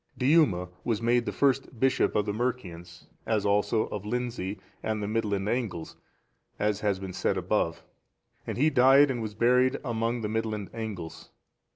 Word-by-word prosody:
Diuma 125 Hz, -, +3 dB
was 115 Hz, -3 st, 0 dB
made 120 Hz, +1 st, +1 dB
the -, -, 0 dB
first 135 Hz, -3 st, 0 dB
bishop 135 Hz, +1 st, +2 dB
of 105 Hz, -, +2 dB
the 105 Hz, -, -2 dB
Mercians, 105 Hz, -8 st, -4 dB, 0.2 s
as 110 Hz, -2 st, +1 dB
also 105 Hz, +2 st, +2 dB
of 105 Hz, -2 st, -5 dB
Lindsey 115 Hz, -3 st, -3 dB, 0.2 s
and 110 Hz, -1 st, -2 dB
the 105 Hz, -, -3 dB
Midland 105 Hz, -2 st, -1 dB
Angles, 105 Hz, -9 st, -3 dB, 0.6 s
as 105 Hz, -1 st, 0 dB
has 105 Hz, -2 st, 0 dB
been 95 Hz, -1 st, -7 dB
said 95 Hz, +1 st, 0 dB
above,(444) 90 Hz, -3 st, -1 dB, 0.6 s
and -, -, -3 dB
he 150 Hz, +5 st, +3 dB
died 135 Hz, +2 st, +6 dB
and 120 Hz, -3 st, -3 dB
was 105 Hz, -2 st, -5 dB
buried 125 Hz, +3 st, +3 dB
among 115 Hz, 0 st, -1 dB
the 105 Hz, -, -2 dB
Midland 110 Hz, -2 st, -3 dB
Angles. 105 Hz, -8 st, -6 dB
110 Hz, 165 wpm, -28 LUFS, 100-125 Hz, 0.6 s, died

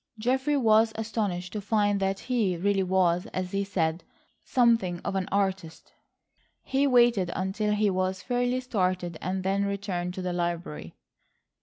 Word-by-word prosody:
Geoffrey 265 Hz, +6 st, +1 dB
was 220 Hz, -3 st, +4 dB
astonished 205 Hz, -5 st, -3 dB
to 210 Hz, -, -3 dB
find 205 Hz, -1 st, +1 dB
that 195 Hz, 0 st, -1 dB
he 220 Hz, -8 st, 0 dB
really 195 Hz, +2 st, +1 dB
was, 180 Hz, -2 st, +1 dB
as 185 Hz, -1 st, -3 dB
he 200 Hz, 0 st, 0 dB
said, 170 Hz, -4 st, -1 dB, 0.4 s
something 230 Hz, -8 st, +2 dB
of -, -, -3 dB
an 190 Hz, -1 st, -2 dB
artist. 190 Hz, -5 st, -2 dB, 0.7 s
He 275 Hz, +1 st, +1 dB
waited 240 Hz, -8 st, +4 dB
until 210 Hz, +3 st, -1 dB
he 210 Hz, -1 st, +2 dB
was 185 Hz, 0 st, -1 dB
fairly 245 Hz, +1 st, 0 dB
started 185 Hz, -8 st, -1 dB
and 185 Hz, +2 st, -2 dB
then 195 Hz, +1 st, +1 dB
returned 190 Hz, -3 st, -3 dB
to 185 Hz, -, -5 dB
the 180 Hz, -1 st, -2 dB
library. 170 Hz, -, -4 dB
195 Hz, 150 wpm, -27 LUFS, 180-220 Hz, 0.7 s, was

